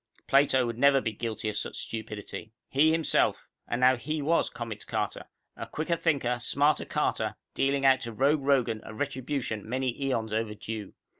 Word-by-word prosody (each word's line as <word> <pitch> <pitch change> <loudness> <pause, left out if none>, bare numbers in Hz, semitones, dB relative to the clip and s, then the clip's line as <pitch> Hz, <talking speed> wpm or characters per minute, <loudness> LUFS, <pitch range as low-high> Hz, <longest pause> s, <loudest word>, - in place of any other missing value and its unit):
Plato 135 -2 +4
would 115 0 -4
never 140 0 +6
be 115 - -2
guilty 110 0 -4
of 105 - -2
such - - -3
stupidity. 110 0 -5 0.2
He 150 +4 +4
himself 160 -1 +2 0.2
and 120 - -2
now 130 0 +6
he 155 +6 -3
was 160 +4 +2
Comets 115 -3 -6
Carter, 105 -2 -3 0.3
a - - -6
quicker 160 +2 -1
thinker, 135 -8 0
smarter 145 +5 +2
Carter, - - -1 0.2
dealing 135 0 +1
out 130 -1 +5
to 120 - -4
Rogue 140 +6 +2
Rogan 130 -5 +2
a 110 - -9
retribution 125 -4 -3
many 130 0 -1
eons 115 -5 -1
overdue. 110 -1 -4
125 Hz, 165 wpm, -28 LUFS, 110-140 Hz, 0.3 s, never